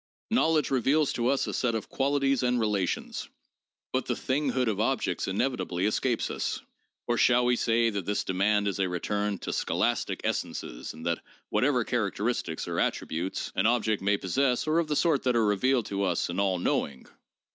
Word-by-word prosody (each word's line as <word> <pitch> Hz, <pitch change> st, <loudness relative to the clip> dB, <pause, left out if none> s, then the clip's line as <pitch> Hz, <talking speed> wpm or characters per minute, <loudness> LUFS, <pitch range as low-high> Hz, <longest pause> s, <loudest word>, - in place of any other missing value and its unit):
Knowledge 160 Hz, -, +2 dB
reveals 135 Hz, +3 st, +2 dB
to 120 Hz, 0 st, 0 dB
us 135 Hz, +1 st, +2 dB
a -, -, -4 dB
set 120 Hz, -3 st, 0 dB
of 110 Hz, -, -3 dB
qualities 135 Hz, -1 st, +1 dB
and 125 Hz, -1 st, +1 dB
relations, 105 Hz, -5 st, -1 dB, 0.6 s
but -, -, 0 dB
the -, -, 0 dB
thing 140 Hz, +3 st, -1 dB
hood 130 Hz, -2 st, 0 dB
of 105 Hz, -3 st, 0 dB
objects 110 Hz, -6 st, 0 dB
inevitably 95 Hz, -3 st, -1 dB
escapes 115 Hz, +3 st, 0 dB
us. -, -, -2 dB, 0.5 s
Or 120 Hz, -1 st, 0 dB
shall 125 Hz, 0 st, +4 dB
we 125 Hz, 0 st, +3 dB
say 115 Hz, -1 st, +2 dB
that 100 Hz, -4 st, -4 dB
this 105 Hz, -, 0 dB
demand 100 Hz, +2 st, +1 dB
is 100 Hz, 0 st, -2 dB
a 95 Hz, -1 st, +1 dB
return 100 Hz, +3 st, -1 dB
to -, -, -5 dB
scholastic -, -, 0 dB
essences -, -, -3 dB
and 80 Hz, +1 st, -10 dB
that 85 Hz, -1 st, 0 dB, 0.3 s
whatever 130 Hz, -2 st, +2 dB
characteristics 105 Hz, -6 st, -2 dB
or -, -, -2 dB
attributes 85 Hz, +4 st, -2 dB
an 105 Hz, -, +2 dB
object 110 Hz, -3 st, +1 dB
may 100 Hz, +1 st, +2 dB
possess 125 Hz, +7 st, +1 dB
are 155 Hz, +2 st, +3 dB
of 170 Hz, -, 0 dB
the 150 Hz, -, 0 dB
sort 155 Hz, -2 st, +2 dB
that 125 Hz, -1 st, +2 dB
are 115 Hz, -2 st, +3 dB
revealed 120 Hz, +4 st, +2 dB
to 100 Hz, 0 st, -3 dB
us 90 Hz, -3 st, 0 dB
in 90 Hz, -, -3 dB
all 95 Hz, -2 st, +2 dB
knowing? 70 Hz, -6 st, -1 dB
115 Hz, 185 wpm, -28 LUFS, 100-130 Hz, 0.6 s, shall